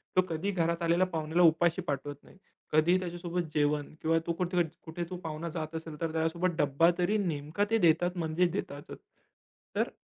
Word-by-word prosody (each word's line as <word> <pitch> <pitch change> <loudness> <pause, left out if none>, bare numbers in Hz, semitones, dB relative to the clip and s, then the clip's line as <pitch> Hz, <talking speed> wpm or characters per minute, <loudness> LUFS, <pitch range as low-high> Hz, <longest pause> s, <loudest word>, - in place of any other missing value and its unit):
तो 185 - +6
कधीही 170 +5 -2
घरात 170 -1 0
आलेल्या 170 +2 +3
पाहुण्याला 160 0 +1
उपाशी 170 +2 +4
पाठवत 145 -3 -3
नाही. - - -18 0.3
कधीही 165 +4 +4
त्याच्यासोबत 175 0 -3
जेवण 145 0 0
किंवा 165 +1 +2
तो 170 - +1
कुठ 180 +2 -2
कुठे 170 0 -2
तो 180 - -5
पाहुणा 160 +1 -4
जात 160 -1 -5
असेल 160 -2 -6
तर 165 -1 -1
त्याच्यासोबत 165 +2 0
डब्बा 145 +3 +4
तरी 185 +4 +2
नेमका 165 0 -1
ते 225 - +3
देतात 175 -1 +3
म्हणजेच 170 +1 +1
देतातच. 145 -6 -5 0.8
तर - - +1
165 Hz, 175 wpm, -30 LUFS, 155-180 Hz, 0.8 s, तो